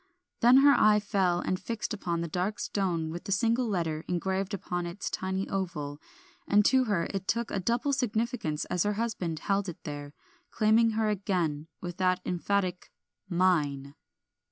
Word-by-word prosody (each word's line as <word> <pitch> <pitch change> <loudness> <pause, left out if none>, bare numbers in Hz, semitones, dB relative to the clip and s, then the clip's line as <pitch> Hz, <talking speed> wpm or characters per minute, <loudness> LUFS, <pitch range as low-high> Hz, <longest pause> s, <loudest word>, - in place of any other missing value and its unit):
Then 245 +3 +7
her 285 - +8
eye 210 -4 +5
fell 190 -4 +1
and 185 - -1
fixed 230 0 -4
upon 170 -5 -2
the 170 - -2
dark 180 +6 -2
stone 170 -5 -1
with 170 +1 -7
the - - -4
single 230 +4 +2
letter 165 -6 -1
engraved 190 +2 -1
upon 175 -3 -3
its 175 +4 -5
tiny 190 +1 -2
oval, 155 -7 -4 0.5
and 205 -4 +4
to 260 +1 +4
her 195 -7 0
it 195 0 -4
took 235 +3 -1
a 200 - -1
double 240 +8 0
significance 220 - -1
as 180 -1 -1
her 210 +2 +2
husband 205 -7 -2
held 195 +4 -1
it 175 +1 -9
there, 145 -1 -7 0.3
claiming 220 +1 +3
her 220 -1 +2
again, 175 -7 -1
with 175 -1 -6
that 185 -1 +2
emphatic 180 0 -1 0.4
"Mine." 150 -7 +1
190 Hz, 165 wpm, -29 LUFS, 170-210 Hz, 0.5 s, her